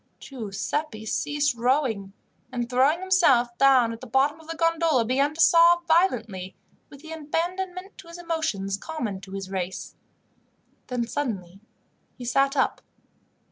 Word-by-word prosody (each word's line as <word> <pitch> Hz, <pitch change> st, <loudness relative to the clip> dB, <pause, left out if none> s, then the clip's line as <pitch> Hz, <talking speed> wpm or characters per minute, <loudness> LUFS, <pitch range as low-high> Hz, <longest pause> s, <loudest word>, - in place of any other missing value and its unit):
Giuseppi 220 Hz, +1 st, -4 dB
ceased 290 Hz, +5 st, 0 dB
rowing, 235 Hz, -5 st, 0 dB, 0.4 s
and, 240 Hz, -2 st, -3 dB
throwing 265 Hz, +7 st, +2 dB
himself 285 Hz, -11 st, +3 dB
down 260 Hz, -4 st, +5 dB
at 230 Hz, -, -10 dB
the 255 Hz, -, -9 dB
bottom 275 Hz, +5 st, +1 dB
of 320 Hz, -, -16 dB
the 330 Hz, -, -5 dB
gondola, 330 Hz, -6 st, +2 dB
began 275 Hz, +5 st, +1 dB
to -, -, -13 dB
sob 340 Hz, +1 st, +6 dB
violently, 230 Hz, -, +1 dB, 0.3 s
with 280 Hz, -, -14 dB
the 320 Hz, 0 st, -11 dB
abandonment 360 Hz, +5 st, -4 dB
to 375 Hz, -, -12 dB
his 335 Hz, +1 st, -10 dB
emotions 315 Hz, -, -2 dB
common 220 Hz, -8 st, -5 dB
to 195 Hz, 0 st, -11 dB
his 195 Hz, -1 st, -6 dB
race. 190 Hz, -1 st, -4 dB, 0.9 s
Then 250 Hz, -2 st, -2 dB
he 235 Hz, -, -2 dB
suddenly 195 Hz, -10 st, -4 dB, 0.6 s
sat 275 Hz, +3 st, +1 dB
up. 265 Hz, -, +1 dB
275 Hz, 140 wpm, -25 LUFS, 225-325 Hz, 0.9 s, sob